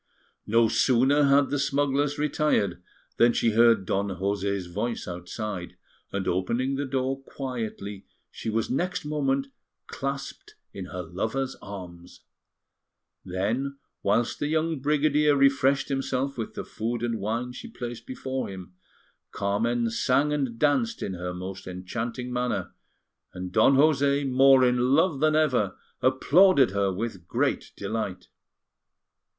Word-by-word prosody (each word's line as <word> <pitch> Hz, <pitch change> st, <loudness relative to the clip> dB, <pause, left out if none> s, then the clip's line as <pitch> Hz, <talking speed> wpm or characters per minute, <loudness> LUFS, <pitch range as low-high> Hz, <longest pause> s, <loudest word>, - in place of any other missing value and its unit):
No 115 Hz, +1 st, +4 dB
sooner 130 Hz, +5 st, +3 dB
had 140 Hz, 0 st, +4 dB
the 145 Hz, -, 0 dB
smugglers 145 Hz, +1 st, +1 dB
retired 145 Hz, -, +1 dB, 0.4 s
than 120 Hz, 0 st, +5 dB
she 115 Hz, -, +2 dB
heard 115 Hz, -2 st, +4 dB
Don 100 Hz, +2 st, 0 dB
José's 100 Hz, 0 st, -2 dB
voice 105 Hz, +7 st, -3 dB
outside; 90 Hz, +2 st, -6 dB, 0.3 s
and 100 Hz, -1 st, -3 dB
opening 115 Hz, +9 st, 0 dB
the 140 Hz, +1 st, -2 dB
door 135 Hz, 0 st, -1 dB
quietly, 115 Hz, -7 st, -6 dB, 0.2 s
she -, -, -5 dB
was 110 Hz, +1 st, 0 dB
next 180 Hz, +4 st, -2 dB
moment 140 Hz, -2 st, 0 dB, 0.4 s
clasped 140 Hz, 0 st, -6 dB, 0.2 s
in 95 Hz, -2 st, -6 dB
her 90 Hz, 0 st, -6 dB
lover's 110 Hz, +10 st, -3 dB
arms. 90 Hz, -3 st, -10 dB, 1.0 s
Then, 115 Hz, +10 st, -2 dB, 0.2 s
whilst 115 Hz, +4 st, +1 dB
the 145 Hz, -, -1 dB
young 160 Hz, 0 st, 0 dB
brigadier 150 Hz, +1 st, +3 dB
refreshed 140 Hz, 0 st, +3 dB
himself 135 Hz, 0 st, -1 dB
with 115 Hz, -2 st, -5 dB
the -, -, -4 dB
food 115 Hz, +2 st, -3 dB
and 115 Hz, -2 st, -1 dB
wine 115 Hz, +5 st, -2 dB
she 125 Hz, -, -9 dB
placed 120 Hz, -, -7 dB
before 130 Hz, 0 st, -4 dB
him, 95 Hz, -2 st, -9 dB, 0.6 s
Carmen 115 Hz, +4 st, 0 dB
sang 135 Hz, +6 st, +2 dB
and 135 Hz, -6 st, -2 dB
danced 225 Hz, -, +1 dB
in 95 Hz, -, -3 dB
her 90 Hz, 0 st, -4 dB
most 95 Hz, +1 st, -7 dB
enchanting 115 Hz, +7 st, -5 dB
manner, 125 Hz, 0 st, -2 dB, 0.6 s
and 90 Hz, 0 st, -5 dB
Don 110 Hz, +8 st, +5 dB
José, 140 Hz, -1 st, +3 dB
more 135 Hz, 0 st, +6 dB
in 125 Hz, +2 st, +3 dB
love 160 Hz, -3 st, +2 dB
than 155 Hz, +1 st, +3 dB
ever, 130 Hz, -11 st, +1 dB, 0.2 s
applauded 140 Hz, -, +5 dB
her 100 Hz, -1 st, +1 dB
with 95 Hz, -3 st, -5 dB
great -, -, -1 dB
delight. 95 Hz, -5 st, -4 dB
125 Hz, 135 wpm, -26 LUFS, 100-140 Hz, 1.0 s, more